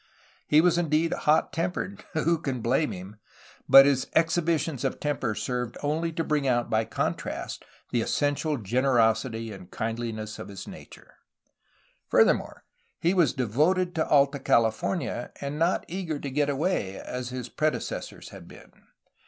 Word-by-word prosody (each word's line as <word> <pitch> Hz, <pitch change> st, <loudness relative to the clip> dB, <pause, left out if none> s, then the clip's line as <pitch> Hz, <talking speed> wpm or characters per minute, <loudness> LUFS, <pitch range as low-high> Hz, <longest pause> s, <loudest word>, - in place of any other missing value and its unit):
He 150 Hz, +1 st, +6 dB
was 175 Hz, 0 st, +3 dB
indeed 160 Hz, 0 st, +1 dB
hot 155 Hz, +1 st, +2 dB
tempered, 180 Hz, +4 st, -3 dB
— -, -, -27 dB
Who 165 Hz, +1 st, +2 dB
can 135 Hz, -6 st, -3 dB
blame 135 Hz, +7 st, +1 dB
him! 95 Hz, +3 st, -9 dB, 0.3 s
— -, -, -25 dB
but 135 Hz, 0 st, +10 dB
his 140 Hz, -2 st, +2 dB
exhibitions 160 Hz, -4 st, +1 dB
of 135 Hz, -, -2 dB
temper 135 Hz, -7 st, -1 dB
served 125 Hz, +2 st, -3 dB
only 160 Hz, +3 st, 0 dB
to 165 Hz, -, -1 dB
bring 150 Hz, -3 st, 0 dB
out 120 Hz, -2 st, +1 dB
by 110 Hz, 0 st, +2 dB
contrast -, -, -3 dB, 0.3 s
the 120 Hz, -, +1 dB
essential 145 Hz, +4 st, 0 dB
generosity 115 Hz, 0 st, +1 dB
and 95 Hz, -3 st, -11 dB
kindhness 110 Hz, -2 st, -4 dB
of -, -, -7 dB
his 100 Hz, -2 st, -9 dB
nature. -, -, -13 dB, 0.9 s
Furthermore, -, -, +2 dB, 0.4 s
he 170 Hz, +3 st, +2 dB
was 170 Hz, -9 st, +3 dB
devoted 155 Hz, -, +1 dB
to 160 Hz, -2 st, 0 dB
Alta 140 Hz, -1 st, +4 dB
California, 120 Hz, -, 0 dB
and 140 Hz, +2 st, -4 dB
not 170 Hz, +3 st, +1 dB
eager 170 Hz, -3 st, -3 dB
to 140 Hz, -1 st, -6 dB
get 145 Hz, +1 st, +1 dB
away, 140 Hz, -, -1 dB
as 125 Hz, 0 st, -5 dB
his 125 Hz, -1 st, -5 dB
predecessors 155 Hz, +4 st, -3 dB
had -, -, -12 dB
been. -, -, -15 dB
140 Hz, 150 wpm, -27 LUFS, 120-160 Hz, 0.9 s, but